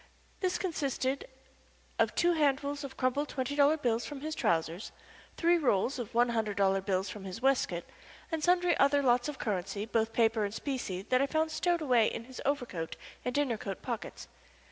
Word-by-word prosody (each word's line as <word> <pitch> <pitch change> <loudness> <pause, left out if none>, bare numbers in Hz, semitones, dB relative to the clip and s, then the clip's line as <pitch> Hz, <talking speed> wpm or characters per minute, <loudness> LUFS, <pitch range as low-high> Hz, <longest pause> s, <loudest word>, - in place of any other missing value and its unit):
This 370 -1 0
consisted 280 -7 -2 0.7
of - - +2
two 345 0 +3
handfuls 285 -1 +1
of 270 -1 -8
crumpled 270 +3 0
twenty 265 +1 -2
dollar 290 +2 +5
bills 240 -5 0
from 290 -2 -7
his 310 +1 -3
trousers, 165 - -1 0.5
three 340 0 +4
rolls 250 -1 +1
of 230 -2 -6
one 240 +1 +4
hundred 220 -3 -1
dollar 195 -1 +3
bills 190 0 0
from 190 +2 -7
his 190 -1 -6
waistcoat, 255 -10 +1 0.5
and 320 -2 -2
sundry 355 0 +4
other 280 +1 +4
lots 245 +1 +3
of 295 - -6
currency, 200 0 -2
both 225 0 0
paper 225 -1 +2
and 205 +1 -3
specie, 240 -10 -3
that 255 +5 +2
I 275 - +2
found 315 +2 0
stowed 345 +1 +1
away 245 -6 +4
in - - -4
his 255 +2 -9
overcoat 245 - -2 0.3
and 250 - -2
dinner 270 -7 +1
coat 195 -2 -6
pockets. 235 -4 -5
255 Hz, 185 wpm, -31 LUFS, 210-290 Hz, 0.7 s, dollar